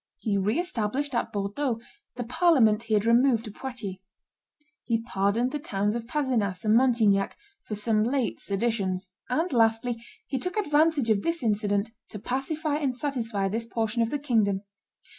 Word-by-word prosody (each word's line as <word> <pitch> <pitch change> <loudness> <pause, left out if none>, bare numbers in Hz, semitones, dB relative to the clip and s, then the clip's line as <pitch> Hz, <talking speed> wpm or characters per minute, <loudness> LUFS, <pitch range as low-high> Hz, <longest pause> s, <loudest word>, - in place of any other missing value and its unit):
He 215 -4 -1
re 200 +6 +1
established 285 - -2
at 235 - -1
Bordeaux 220 +5 -1 0.4
the 245 - -3
parliament 245 -4 +4
he 225 -2 0
had 210 +1 +2
removed 235 0 +4
to 215 - -7
Poitiers; 225 -6 -6 0.9
he 230 -2 +1
pardoned 225 +3 0
the 295 - -3
towns 205 -7 -1
of 230 0 -4
Pdzenas 235 -9 -1
and 215 +1 +4
Montignac 225 -6 +3 0.2
for 210 - -5
some 215 0 +2
late 255 +1 0
seditions; 195 -3 -1 0.2
and, 315 +5 0
lastly, 230 0 +2 0.2
he 270 - -2
took 360 - -4
advantage 300 - +3
of 200 -2 +2
this 335 0 -1
incident 205 -1 +1 0.2
to - - -7
pacify 290 - -2
and 275 -4 -1
satisfy 230 -8 -1
this 225 +4 -2
portion 230 0 -1
of 225 - +1
the 290 - -1
kingdom. 220 -8 +1
230 Hz, 160 wpm, -27 LUFS, 210-265 Hz, 0.9 s, parliament